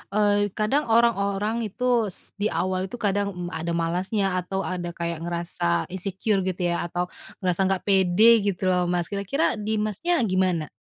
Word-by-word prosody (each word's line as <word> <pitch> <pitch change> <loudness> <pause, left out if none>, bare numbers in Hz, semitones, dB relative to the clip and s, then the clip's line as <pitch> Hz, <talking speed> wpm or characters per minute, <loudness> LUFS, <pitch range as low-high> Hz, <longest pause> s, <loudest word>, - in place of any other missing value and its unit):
eee, 205 -1 +3
kadang 250 +8 +1
orang-orang 220 -1 +2
itu 240 +1 +1
s 185 - -7
di 210 - +2
awal 185 +1 -1
itu 220 - -8
kadang 205 -3 0 0.2
ada 165 +1 -3
malasnya 185 +4 0
atau 190 +2 -3
ada 175 -2 -4
kayak 170 -1 -3
ngerasa 170 - -1
insecure 195 +2 -1
gitu 180 -1 -1
ya 170 - -1
atau 175 +1 -2 0.4
ngerasa 185 +1 +2
nggak 190 -1 0
pede 200 +3 +5
gitu 195 -1 -2
loh 180 -1 +1
Mas 175 0 -1
kira-kira 205 - 0
di 215 +1 -1
Masnya 215 - 0
gimana? 185 -6 0
195 Hz, 160 wpm, -25 LUFS, 175-215 Hz, 0.4 s, pede